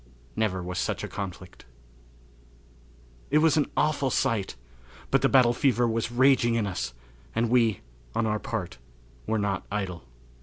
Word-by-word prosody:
Never 95 -5 0
Was 90 0 -4
Such - - -2
a - - -3
Conflict. 95 -5 -7 1.6
It 150 - +3
was 155 -1 +4
an 150 -3 +1
awful 145 -3 +2
sight; 110 -5 0 0.6
but - - +4
the - - +3
battle 125 -3 +5
fever 120 -2 +2
was 115 0 -1
raging 125 -1 +4
in 115 -2 +1
us, 90 -10 -4 0.4
and 115 +1 +1
we, 115 -5 +3 0.3
on 115 - +1
our 105 -1 0
part, 110 - -5 0.5
were 110 - +1
not 100 -2 -1
idle. 95 -5 -3
115 Hz, 150 wpm, -27 LUFS, 100-125 Hz, 1.6 s, battle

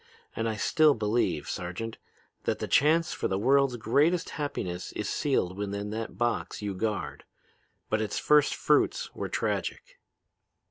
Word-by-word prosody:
And 115 0 -1
I 110 - -2
still 150 +6 +4
believe, 105 -8 0
Sergeant, 90 +6 -5 0.5
that - - 0
the - - -4
chance 160 +3 +3
for - - -1
the 95 - -1
world's 135 +3 +3
greatest 145 +10 +2
happiness 95 - -4
is 105 - -3
sealed 105 - 0
within 100 +1 -4
that 110 -4 -5
box 120 +2 -1
you 105 -1 -3
guard. 105 +2 -3 0.6
But 110 0 0
its 110 - -2
first 150 -1 +4
fruits - - +1
were - - -4
tragic." - - -3
110 Hz, 145 wpm, -28 LUFS, 100-145 Hz, 0.6 s, still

